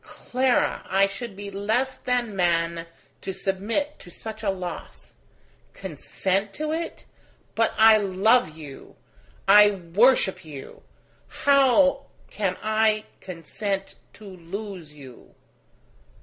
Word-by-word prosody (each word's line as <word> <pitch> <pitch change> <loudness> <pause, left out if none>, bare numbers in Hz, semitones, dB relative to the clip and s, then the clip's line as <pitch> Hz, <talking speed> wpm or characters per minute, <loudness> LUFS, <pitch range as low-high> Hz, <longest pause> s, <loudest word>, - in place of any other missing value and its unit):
Clara, 255 0 0
I 195 +1 +4
should 200 +2 -6
be 200 0 -7
less 220 +7 0
than 245 -4 -1
man 170 -2 0 0.3
to 195 - -4
submit 205 +11 -2
to 180 - -13
such 220 +5 -8
a 210 - 0
loss. 185 -2 -6 0.6
Consent 190 +3 -2
to 305 0 -3
it? 330 +1 -4 0.5
But 225 0 +1
I 220 0 +8
love 200 -2 +2
you! 145 -4 -11 0.5
I 210 +1 +8
worship 195 +3 +2
you! 145 -4 -10 0.5
How 275 0 +3 0.2
can 190 -3 -1
I 215 0 +2
consent 195 +3 -4 0.2
to 215 - -14
lose 185 -2 -8
you 135 -4 -14
200 Hz, 110 wpm, -25 LUFS, 185-225 Hz, 0.6 s, I